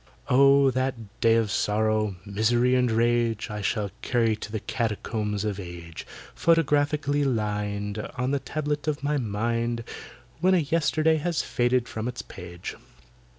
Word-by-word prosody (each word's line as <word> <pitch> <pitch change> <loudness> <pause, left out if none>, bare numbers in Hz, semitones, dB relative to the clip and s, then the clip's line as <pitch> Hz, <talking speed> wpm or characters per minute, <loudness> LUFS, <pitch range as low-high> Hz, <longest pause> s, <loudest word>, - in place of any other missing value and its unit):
Oh! 140 +1 +6
that 130 +1 0 0.3
day 115 0 +5
of 115 -3 +1
sorrow, 110 -1 +1
misery, 115 +5 +2
and 125 -1 +3
rage, 115 -1 +1
I 105 0 -4
shall 100 0 -1
carry 115 -3 +1
to 105 0 -8
the 110 - -2
Catacombs 105 -2 -2
of 105 -2 -2
Age, 85 -3 -8 0.3
Photographically 145 -2 +2
lined 105 -4 -1 0.2
On 130 +1 -1
the 140 - +1
tablet 150 +2 -3
of 145 -2 -1
my 145 +1 +1
mind, 115 +1 -1 0.6
When 185 +3 +4
a - - +5
yesterday 160 0 +2
has 165 +1 -1
faded 120 0 +1
from 110 +1 -4
its 125 0 -5
page! 85 -1 -8
120 Hz, 145 wpm, -26 LUFS, 105-140 Hz, 0.6 s, Oh